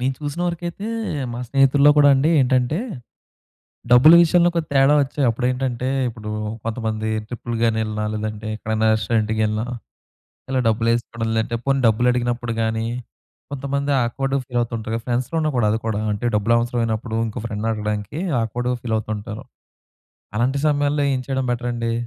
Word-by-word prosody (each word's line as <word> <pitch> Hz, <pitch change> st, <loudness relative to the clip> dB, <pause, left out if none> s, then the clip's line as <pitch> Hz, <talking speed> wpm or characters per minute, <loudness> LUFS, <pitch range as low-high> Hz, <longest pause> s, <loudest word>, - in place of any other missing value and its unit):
నేను 130 Hz, +1 st, 0 dB
చూసిన 150 Hz, +3 st, -5 dB
వరకైతే, 175 Hz, +5 st, -5 dB, 0.4 s
మా 120 Hz, -, -5 dB
స్నేహితుల్లో 140 Hz, +2 st, +5 dB
కూడా 145 Hz, -1 st, +6 dB
అండి 145 Hz, +5 st, +2 dB
ఏంటంటే, 130 Hz, +4 st, +2 dB, 1.1 s
డబ్బుల 130 Hz, +7 st, +8 dB
విషయంలో 175 Hz, +1 st, +4 dB
ఒక 170 Hz, -, +1 dB
తేడా 135 Hz, +2 st, +5 dB
వచ్చే 140 Hz, +2 st, -5 dB
అప్పుడు 125 Hz, +2 st, -2 dB
ఏంటంటే, 130 Hz, -1 st, -2 dB, 0.2 s
ఇప్పుడూ 110 Hz, -2 st, -7 dB, 0.4 s
కొంతమంది 110 Hz, -1 st, -2 dB, 0.2 s
ట్రిప్‌లు 120 Hz, -1 st, -5 dB
గాని, 110 Hz, -1 st, +2 dB
ఎళ్ళినా 105 Hz, 0 st, -3 dB
లేదంటే 110 Hz, 0 st, -4 dB
ఎక్కడైనా 110 Hz, 0 st, 0 dB
రెస్టారెంట్‌కి 110 Hz, +1 st, 0 dB
ఎళ్ళినా. 110 Hz, +1 st, -1 dB, 0.9 s
ఇలా 130 Hz, -, +1 dB
డబ్బులు 115 Hz, +1 st, +1 dB
ఏసుకోవడం 115 Hz, -1 st, -3 dB
లేదంటే 110 Hz, +1 st, -1 dB
పోనీ 135 Hz, 0 st, +2 dB
డబ్బులు 115 Hz, +3 st, +2 dB
అడిగినప్పుడు 120 Hz, -1 st, -1 dB
గాని, 110 Hz, 0 st, -1 dB, 0.7 s
కొంతమంది 140 Hz, +1 st, -2 dB
ఆక్వర్డ్‌గా 135 Hz, +3 st, -1 dB
ఫీల్ 125 Hz, -1 st, -2 dB
అవుతూ 120 Hz, 0 st, -4 dB
ఉంటారు 110 Hz, +1 st, -5 dB
కదా! 115 Hz, -, -4 dB
ఫ్రెండ్స్‌లో 125 Hz, +6 st, -1 dB
ఉన్న 155 Hz, -1 st, 0 dB
గూడా 110 Hz, -3 st, +3 dB
అది 110 Hz, -, 0 dB
కూడా, 105 Hz, -1 st, -1 dB
అంటే 110 Hz, +4 st, -2 dB
డబ్బులు 115 Hz, +3 st, +2 dB
అవసరమైనప్పుడు 115 Hz, -1 st, -2 dB
ఇంకో 110 Hz, +1 st, -6 dB
ఫ్రెండ్‌ని 110 Hz, +1 st, -3 dB
అడగడానికి 105 Hz, -, -3 dB, 0.2 s
ఆక్వర్డ్‌గా 125 Hz, +3 st, -2 dB
ఫీల్ 110 Hz, -2 st, -1 dB
అవుతూ 110 Hz, -, -6 dB
ఉంటారు. 105 Hz, +1 st, -8 dB, 0.9 s
అలాంటి 130 Hz, +4 st, +1 dB
సమయాల్లో 145 Hz, 0 st, +1 dB
ఏం 130 Hz, -, -1 dB
చేయడం 130 Hz, -1 st, -1 dB
బెటర్ 120 Hz, 0 st, -2 dB
అండి? 115 Hz, -1 st, -2 dB
120 Hz, 160 wpm, -21 LUFS, 110-135 Hz, 1.1 s, డబ్బుల